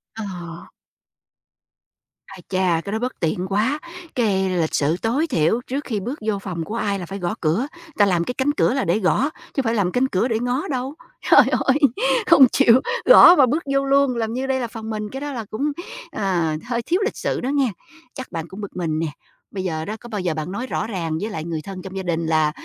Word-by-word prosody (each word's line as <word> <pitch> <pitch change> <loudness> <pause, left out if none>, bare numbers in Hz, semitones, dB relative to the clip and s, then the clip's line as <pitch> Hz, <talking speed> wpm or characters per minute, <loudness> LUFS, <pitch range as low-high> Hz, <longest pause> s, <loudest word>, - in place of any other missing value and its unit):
À. 175 -6 -7 1.6
Ai - - -12
chà, 185 -3 +1
cái 200 - -4
đó 220 - -1
bất 250 +2 -4
tiện 175 +2 -1
quá, 215 +10 0 0.4
cái 195 -6 +1
lịch 170 -4 0
sự 150 +3 +2
tối 265 +9 +1
thiểu 220 - +1
trước 275 +3 -3
khi 220 -7 -3
bước 245 +10 -5
vô 205 -2 0
phòng 180 -4 -4
của 210 +7 -6
ai 205 -3 -1
là 180 - -5
phải 195 +3 -7
gõ 175 -2 -2
cửa, 175 - +1 0.3
ta 205 - +6
làm 180 -4 +2
cái 250 - -3
cánh 265 +3 +1
cửa - - +3
là 270 - 0
để 175 +6 +2
gõ, 235 +8 +2 0.2
chứ 275 - +1
phải 230 -3 0
làm 200 -5 +1
cánh 250 +5 +2
cửa 225 -1 0
để 225 -3 0
ngó 245 +8 -1
đâu. 265 -1 -3 0.4
Trời - - +10
ơi, 270 +1 +2 0.5
không 270 -2 +8
chịu 255 -2 +5 0.2
gõ 360 -7 +9
mà 280 - +6
bước 295 +7 -1
vô 275 0 +2
luôn, 275 -2 +3
làm 225 -1 -2
như 260 +2 -2
đây 265 -1 0
là 240 - -2
phòng 220 -1 -8
mình, 215 -1 -4
cái 270 +4 -7
đó 290 0 -4
là 230 -4 -5
cũng, 285 +7 -1 0.4
ờ, 175 -6 0
hơi 240 -1 -1
thiếu 350 +10 0
lịch 450 - -3
sự - - -2
đó 255 - -2
nghe. 275 -4 +1 0.4
Chắc 260 - -8
bạn 165 0 -4
cũng 190 +4 -9
bực 200 - -7
mình 160 -3 -1
nè, 165 - -1 0.4
bây 190 -2 -4
giờ 160 -3 -3
đó 215 - -4
có 240 - -11
bao 210 -4 -3
giờ 175 -3 -1
bạn 155 +3 -4
nói 235 +6 -4
rõ 220 - -2
ràng 165 -7 -3
với 215 - -2
lại 160 - -4
người 165 -1 -4
thân 190 0 -7
trong 190 +1 -9
gia 190 - -3
đình 170 -2 -1
là, 155 -1 +2
215 Hz, 240 wpm, -22 LUFS, 180-255 Hz, 1.6 s, Trời